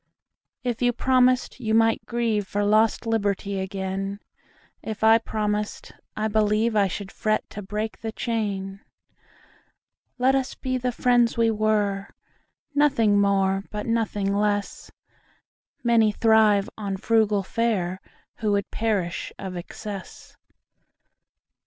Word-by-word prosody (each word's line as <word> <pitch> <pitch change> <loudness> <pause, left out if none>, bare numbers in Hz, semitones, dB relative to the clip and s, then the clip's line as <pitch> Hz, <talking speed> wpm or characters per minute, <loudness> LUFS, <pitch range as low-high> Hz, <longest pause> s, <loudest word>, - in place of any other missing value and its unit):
If 245 -2 -2
you 245 0 +3
promised, 255 +1 +2
you 220 -3 0
might 225 0 +3
grieveFor 210 -4 -1
lost 215 +2 +3
liberty 200 -3 -1
again:If 195 +3 -6
I 225 +1 +7
promised, 210 -2 -3 0.3
I 215 0 0
believeI 215 -1 +2
should 195 +1 -6
fret 215 0 -1
to 210 - -6
break 210 +3 -4
the 225 0 -4
chain. 200 -5 -3 1.4
Let 255 +2 +3
us 270 -1 -1
be 255 -1 -2
the 250 0 -1
friends 240 -1 +2
we 230 -1 +3
were, 210 -2 0 0.6
Nothing 230 -8 +3
more 195 -1 +1
but 210 0 -5
nothing 210 -4 0
less:Many 210 +2 -2
thrive 215 -2 +4
on 200 -3 -4
frugal 215 -1 +2
fareWho 190 -4 -1 0.5
would 200 -1 -1
perish 205 -6 -1
of 190 -2 -6
excess. 195 +3 -8
215 Hz, 110 wpm, -24 LUFS, 200-230 Hz, 1.4 s, I